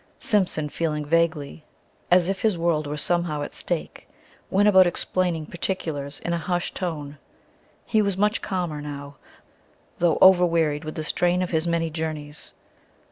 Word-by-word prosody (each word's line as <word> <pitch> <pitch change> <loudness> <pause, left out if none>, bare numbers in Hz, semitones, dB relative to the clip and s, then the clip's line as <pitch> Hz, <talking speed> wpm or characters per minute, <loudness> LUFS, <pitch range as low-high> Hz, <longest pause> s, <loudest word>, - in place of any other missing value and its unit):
Simpson, 185 -8 +1
feeling 150 -1 -2
vaguely 160 -1 0 0.5
as 175 -1 +5
if 195 0 -2
his 215 -5 +2
world 165 -3 0
were 150 +1 -4
somehow 165 -2 0
at - - -6
stake, - - -5 0.4
went 205 +2 +3
about 190 -3 +7
explaining 175 -2 -1
particulars 155 -5 -4
in 170 - -2
a 170 - 0
hushed 175 +2 -2
tone. 150 -5 -5 0.7
He 220 - +2
was 200 -2 0
much 210 +2 +1
calmer 175 -6 -3
now, 140 -1 -8 0.8
though 170 -2 +3
overwearied 165 -5 +4
with 155 - -6
the 155 - -3
strain 175 +3 +1
of 180 - -4
his 160 0 +1
many 165 -1 0
journeys. 150 -2 -5
165 Hz, 150 wpm, -24 LUFS, 150-180 Hz, 0.8 s, about